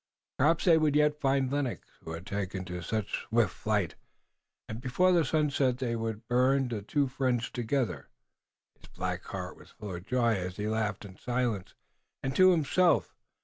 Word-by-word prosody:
Perhaps 155 +5 +3
they 165 -3 +6
would 150 -2 +2
yet 150 0 +3
find 135 -1 +2
Lennox, 140 -4 -2 0.2
who 80 - -6
had 85 +3 -7
taken 95 -2 -3
to 90 -1 -5
such 105 +4 -3
swift 110 -4 +2
flight, 105 -6 -1 0.7
and 110 +2 -6
before 135 +9 +2
the 175 -2 +4
sun 150 +1 +1
set 130 -3 +1
they 125 -2 -2
could 110 -1 -4
burn 130 +1 +3
the 110 -4 -3
two 140 +7 0
friends 125 -2 -1
together. 120 - -2 0.7
His - - -16
black - - -4
heart - - -6
was - - -16
full 105 -3 -8
of 85 +2 -8
joy 120 -2 +2
as 90 0 -4
he 105 0 -2
laughed 110 -1 -1
in 95 -2 -12
silence 120 -6 -2 0.5
and 135 0 -2
to 185 0 +7
himself. 175 +1 +3
120 Hz, 180 wpm, -30 LUFS, 105-140 Hz, 0.7 s, to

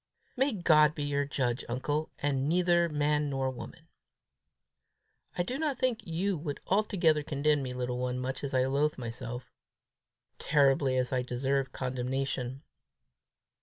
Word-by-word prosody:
"May 270 +1 +2
God 155 -5 +4
be 145 - -3
your 145 0 0
judge, 130 -3 -1
uncle, 145 +5 -1
and 140 -1 0
neither 175 0 +3
man 150 0 +1
nor 135 -1 -1
woman!" 125 - -10 1.5
"I 175 - +2
do 255 +10 -4
not 300 -5 0
think 250 -3 +1
you 180 +4 0
would 145 -2 -4
altogether 185 -6 +2
condemn 145 0 +1
me, 130 -2 -4
little 125 0 -3
one, 125 0 -1
much 130 +2 -4
as 135 -1 -2
I 130 0 +3
loathe 145 +3 +1
myself 120 0 -6 0.9
terribly 135 -2 +3
as 125 +1 0
I 125 - +2
deserve 130 +2 -1
condemnation." 130 +1 -3
140 Hz, 140 wpm, -30 LUFS, 130-155 Hz, 1.5 s, God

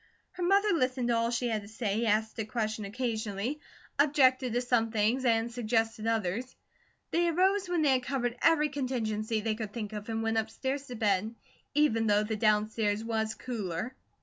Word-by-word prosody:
Her 360 - -9
mother 400 +4 +3
listened 255 -5 0
to 235 - +3
all 230 0 +1
she 240 +1 -1
had 220 -2 -1
to 200 - -12
say, 220 0 -1
asked 220 +1 +1
a - - +1
question 215 -1 -2
occasionally, 220 +2 -3 0.4
objected 260 -4 +4
to 245 - +1
some 240 -2 +1
things, 225 +4 +1
and 230 0 +2
suggested 225 -1 -1
others. 225 +3 -1 0.6
They 345 +1 +2
arose 375 +3 +2
when 345 -3 +1
they 285 - +4
had 260 -1 +3
covered 245 -2 -2
every 305 -2 +4
contingency 225 -6 -2
they 220 0 0
could 215 -2 -6
think 215 -3 -5
of 210 +1 -6
and 225 0 -2
went 225 0 +1
upstairs 265 +5 -3
to 250 - -6
bed, 215 0 0 0.4
even 230 -7 +3
though 205 0 +4
the 220 +1 -2
downstairs 215 0 +1
was 220 -1 -1
cooler. 225 0 -4
230 Hz, 180 wpm, -30 LUFS, 215-255 Hz, 0.6 s, objected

